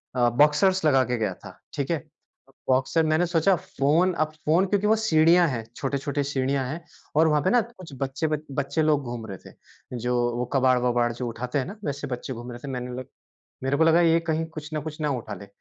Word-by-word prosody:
अ, 120 Hz, -1 st, +3 dB
बॉक्सरस 150 Hz, +9 st, +3 dB
लगा 135 Hz, -3 st, +5 dB
के 125 Hz, -1 st, -1 dB
गया 105 Hz, -4 st, -1 dB
था। -, -, -13 dB, 0.2 s
ठीक 140 Hz, +2 st, -2 dB
है? 165 Hz, -, +2 dB, 0.7 s
बॉक्सर 130 Hz, +5 st, +2 dB
मैंने 155 Hz, +3 st, +2 dB
सोचा 175 Hz, +3 st, +3 dB
फ़ोन, 160 Hz, +3 st, +1 dB
अब 155 Hz, -2 st, -1 dB
फ़ोन 170 Hz, +5 st, +4 dB
क्योंकि 205 Hz, +1 st, +1 dB
वो 220 Hz, -, +5 dB
सीढ़ियाँ 170 Hz, -4 st, +4 dB
हैं, 115 Hz, -4 st, -3 dB
छोटी-छोटी 140 Hz, +1 st, -2 dB
सीढ़ियाँ 135 Hz, -1 st, -1 dB
हैं, 160 Hz, +6 st, -5 dB, 0.3 s
और 160 Hz, +1 st, +5 dB
वहाँ 150 Hz, -1 st, +3 dB
पे 185 Hz, -, +2 dB
ना 245 Hz, -, +5 dB
कुछ 200 Hz, -, -12 dB
बच्चे 135 Hz, +4 st, -1 dB
ब 155 Hz, -1 st, 0 dB, 0.2 s
बच्चे 140 Hz, +3 st, -1 dB
लोग 150 Hz, -2 st, +2 dB
घूम 120 Hz, -2 st, -6 dB
रहे 95 Hz, -3 st, -7 dB
थे, -, -, -12 dB, 0.5 s
जो 125 Hz, +1 st, -1 dB, 0.2 s
वो 125 Hz, -, -1 dB
कबाड़-वबाड़ 125 Hz, -2 st, +2 dB
जो 120 Hz, +1 st, -4 dB
उठाते 125 Hz, +4 st, -3 dB
हैं 130 Hz, -, -2 dB
ना, 200 Hz, -, -7 dB
वैसे 145 Hz, 0 st, -3 dB
बच्चे 125 Hz, +1 st, -5 dB
घूम 120 Hz, +1 st, -8 dB
रहे 120 Hz, -, -8 dB
थे। 140 Hz, -, -5 dB
मैंने 125 Hz, -1 st, -4 dB
बोला 125 Hz, +1 st, -5 dB, 0.6 s
मेरे 135 Hz, +2 st, +1 dB
को 160 Hz, -, +5 dB
लगा 165 Hz, +1 st, +5 dB
ये 165 Hz, -1 st, +4 dB
कहीं 160 Hz, -1 st, -1 dB
कुछ 150 Hz, 0 st, -7 dB
ना 155 Hz, -, -1 dB
कुछ 155 Hz, +1 st, -7 dB
ना 150 Hz, -1 st, 0 dB
उठा 115 Hz, -5 st, -4 dB
लें 100 Hz, -, -11 dB
145 Hz, 225 wpm, -25 LUFS, 125-160 Hz, 0.7 s, लगा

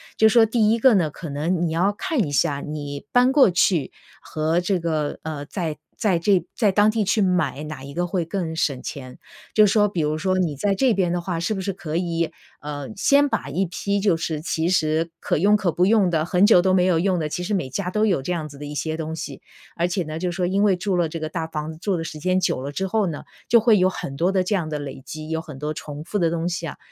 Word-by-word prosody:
就 220 Hz, -, +5 dB
说 225 Hz, 0 st, +6 dB
第 220 Hz, -1 st, +2 dB
一 230 Hz, -, +1 dB
个 260 Hz, +1 st, +6 dB
呢， 175 Hz, -7 st, +2 dB
可 165 Hz, -, -8 dB
能 165 Hz, +5 st, -1 dB
你 160 Hz, -, -3 dB
要 180 Hz, +5 st, +2 dB
看 260 Hz, -, -1 dB
一 145 Hz, -, -5 dB
下 140 Hz, +1 st, +1 dB
你 145 Hz, -2 st, -6 dB
搬 250 Hz, +2 st, +4 dB
过 270 Hz, -9 st, +6 dB
去 170 Hz, -4 st, +2 dB, 0.3 s
和 160 Hz, +3 st, -1 dB
这 185 Hz, 0 st, 0 dB
个， 155 Hz, -3 st, -2 dB
呃， 155 Hz, -3 st, -5 dB
在 165 Hz, -2 st, -4 dB, 0.2 s
在 190 Hz, -6 st, +1 dB
这 180 Hz, -1 st, +2 dB
在 210 Hz, -5 st, +3 dB
当 205 Hz, +2 st, +4 dB
地 220 Hz, -1 st, 0 dB
去 210 Hz, +1 st, +2 dB
买， 180 Hz, -5 st, 0 dB
哪 150 Hz, -3 st, -7 dB
一 140 Hz, -, -8 dB
个 175 Hz, +5 st, -1 dB
会 175 Hz, -1 st, -1 dB
更 165 Hz, -1 st, -3 dB
省 140 Hz, -5 st, -1 dB
钱。 130 Hz, -3 st, -7 dB, 0.4 s
就 215 Hz, -, +7 dB
说 210 Hz, +1 st, +3 dB
比 185 Hz, -4 st, -4 dB
如 150 Hz, 0 st, 0 dB
说 185 Hz, +4 st, 0 dB
你 170 Hz, -5 st, 0 dB
在 195 Hz, +8 st, 0 dB
这 250 Hz, +4 st, +3 dB
边 185 Hz, -4 st, +1 dB
的 175 Hz, -, 0 dB
话 170 Hz, -1 st, -3 dB
是 170 Hz, +6 st, -1 dB
不 195 Hz, -, -4 dB
是 195 Hz, 0 st, -2 dB
可 160 Hz, -3 st, -6 dB
以， 170 Hz, -2 st, -1 dB, 0.3 s
呃， 145 Hz, -1 st, -5 dB
先 280 Hz, +8 st, +4 dB
把 150 Hz, -, -2 dB
一 185 Hz, +7 st, 0 dB
批 200 Hz, +3 st, -2 dB
就 195 Hz, -4 st, +2 dB
是 160 Hz, -1 st, -3 dB
其 160 Hz, +1 st, -1 dB
实 165 Hz, -2 st, +1 dB
可 -, -, -1 dB
用 205 Hz, +5 st, +4 dB
可 185 Hz, -5 st, 0 dB
不 180 Hz, +4 st, +2 dB
用 205 Hz, -5 st, +3 dB
的， 155 Hz, -2 st, +1 dB
很 180 Hz, +4 st, +3 dB
久 195 Hz, -5 st, +6 dB
都 190 Hz, 0 st, +2 dB
没 185 Hz, -1 st, +3 dB
有 175 Hz, -3 st, +3 dB
用 185 Hz, 0 st, +1 dB
的， 155 Hz, -3 st, -1 dB
其 150 Hz, -, -4 dB
实 200 Hz, +4 st, -1 dB
每 175 Hz, -8 st, -1 dB
家 180 Hz, +8 st, -3 dB
都 210 Hz, +3 st, +1 dB
有 185 Hz, -10 st, +1 dB
这 160 Hz, -, -4 dB
样 160 Hz, -3 st, -2 dB
子 140 Hz, -1 st, -13 dB
的 145 Hz, -, -6 dB
一 145 Hz, -, -7 dB
些 155 Hz, +1 st, -2 dB
东 160 Hz, 0 st, -4 dB
西。 165 Hz, -, -7 dB, 0.3 s
而 170 Hz, +1 st, +1 dB
且 180 Hz, +1 st, -1 dB
呢， 155 Hz, 0 st, -6 dB
就 180 Hz, +1 st, -1 dB
是 175 Hz, -, -7 dB
说 180 Hz, -, 0 dB
因 195 Hz, +3 st, +1 dB
为 205 Hz, -3 st, +4 dB
住 185 Hz, +1 st, -1 dB
了 170 Hz, -3 st, +1 dB
这 165 Hz, -, -5 dB
个 155 Hz, 0 st, -4 dB
大 160 Hz, 0 st, -3 dB
房 155 Hz, -1 st, -4 dB
子 155 Hz, -, -14 dB
住 195 Hz, -3 st, 0 dB
的 165 Hz, -, -3 dB
时 155 Hz, -1 st, -7 dB
间 185 Hz, +4 st, +1 dB
久 130 Hz, -, 0 dB
了 140 Hz, +2 st, -5 dB
之 190 Hz, +6 st, -2 dB
后 210 Hz, +1 st, +1 dB
呢， 155 Hz, -4 st, -5 dB, 0.3 s
就 235 Hz, 0 st, +7 dB
会 220 Hz, -2 st, +4 dB
有 185 Hz, +1 st, +4 dB
很 135 Hz, -6 st, -6 dB
多 175 Hz, +6 st, +1 dB
的 190 Hz, -1 st, +2 dB
这 185 Hz, -, -1 dB
样 170 Hz, -6 st, -1 dB
的 150 Hz, -, -2 dB
累 140 Hz, -2 st, -7 dB
积， 155 Hz, +3 st, -8 dB
有 160 Hz, 0 st, -1 dB
很 155 Hz, -4 st, -10 dB
多 150 Hz, +2 st, -3 dB
重 150 Hz, 0 st, -7 dB
复 205 Hz, +6 st, -3 dB
的 170 Hz, -2 st, +2 dB
东 165 Hz, +1 st, -2 dB
西 170 Hz, -1 st, -3 dB
啊， -, -, -7 dB
175 Hz, 295 characters per minute, -23 LUFS, 155-195 Hz, 0.4 s, 就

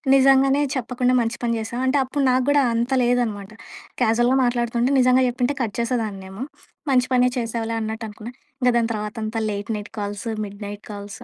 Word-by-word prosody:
నిజంగానే 270 Hz, +1 st, +5 dB
చెప్పకుండా 250 Hz, 0 st, 0 dB
మంచి 230 Hz, 0 st, -2 dB
పని 235 Hz, -1 st, +1 dB
జేసావు. 235 Hz, +3 st, -4 dB
అంటే 275 Hz, +2 st, +3 dB
అప్పుడు 275 Hz, +2 st, -2 dB
నాగూడా 275 Hz, +3 st, +3 dB
అంత 235 Hz, +3 st, -1 dB
లేదనమాట. 225 Hz, -5 st, 0 dB, 0.5 s
క్యాజువల్‌గా 240 Hz, +4 st, +3 dB
మాట్లాడుతుంటే 240 Hz, +1 st, 0 dB
నిజంగా 255 Hz, +1 st, +4 dB
చెప్పుంటే 250 Hz, +3 st, -1 dB
కట్ 215 Hz, -3 st, -4 dB
చేసేదాన్నేమో! 215 Hz, -3 st, -3 dB, 0.5 s
మంచి 250 Hz, -1 st, +3 dB
పనే 250 Hz, 0 st, +4 dB
చేసావులే 230 Hz, -1 st, -2 dB
అన్నట్టు 220 Hz, +1 st, -4 dB
అనుకున్నా. 215 Hz, +3 st, -9 dB, 0.3 s
ఇంక 250 Hz, -, +4 dB
దాని 235 Hz, -1 st, +2 dB
తర్వాత 210 Hz, -1 st, -4 dB
అంతా 220 Hz, +1 st, -2 dB
late 205 Hz, -1 st, -4 dB
night 210 Hz, -1 st, -6 dB
calls, 205 Hz, +2 st, -4 dB
mid 200 Hz, +1 st, -9 dB
night 205 Hz, +1 st, -7 dB
calls. 205 Hz, +3 st, -8 dB
235 Hz, 165 wpm, -22 LUFS, 215-250 Hz, 0.5 s, నిజంగానే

